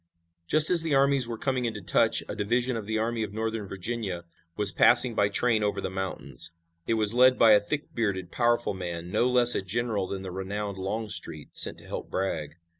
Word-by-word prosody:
Just 155 - +4
as 175 -2 +7
the 160 -3 0
armies 135 -2 +3
were 115 -1 -6
coming 130 0 -2
into 110 -3 -4
touch 90 - +1
a - - -6
division 120 +4 -1
of 110 -3 -6
the 110 0 -2
Army 115 +1 -2
of 105 -2 -5
Northern 110 -2 -4
Virginia 95 -2 -5 0.3
was 105 -2 +5
passing 120 +2 +5
by 105 -2 +1
train 115 +1 +1
over 105 - -1
the - - -4
mountains. 95 -3 -5 0.4
It 115 - +1
was 110 -1 +5
led 125 +1 +4
by 115 - +5
a 105 - +6
thick 145 +9 -5
bearded, 95 -6 -3
powerful 120 -2 0
man, 85 -2 -7
no 125 - +1
less 125 -1 +7
a - - -1
general 105 0 -3
than 95 0 -6
the 95 - -7
renowned 100 +1 -5
Longstreet, 95 -6 -5
sent - - 0
to - - -16
help - - -7
Bragg. 80 -6 -4
110 Hz, 205 wpm, -26 LUFS, 95-120 Hz, 0.4 s, as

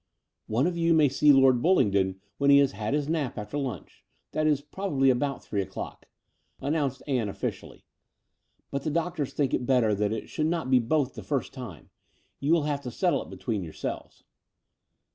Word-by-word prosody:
One 120 +6 +1
of 175 0 0
you 165 -1 +3
may 150 -3 +5
see 145 +3 +5
Lord 135 -3 +5
Bullingdon 100 - +2 0.2
when 140 0 +3
he 140 - +8
has 140 -1 +4
had 110 +4 -2
his 145 -1 -1
nap 155 -6 -1
after 105 +6 -6
lunch 130 - -5
— - - -47
that 155 0 0
is, 150 -3 +3
probably 145 -3 +1
about 135 +1 -1
three 100 - -2
o'clock 95 - -7 0.2
— - - -48
" - - -47
announced 140 -2 -1
Ann 125 -7 0
officially: - - -6 0.9
"but 140 - -2
the 155 - -2
doctors 160 -2 -1
think 140 -3 -1
it 125 - -1
better 125 -5 +3
that 105 +1 0
it 110 -1 -4
should 155 - -1
not 165 -5 -1
be 130 - +6
both 135 +3 0
the - - -8
first 140 -5 -2
time. 120 - -9 0.5
You 140 +3 0
will 165 -2 +4
have 145 -1 -1
to 130 - -5
settle 175 - +1
it - - -10
between 110 -6 -3
yourselves." 80 -2 -6
140 Hz, 200 wpm, -27 LUFS, 120-150 Hz, 0.9 s, he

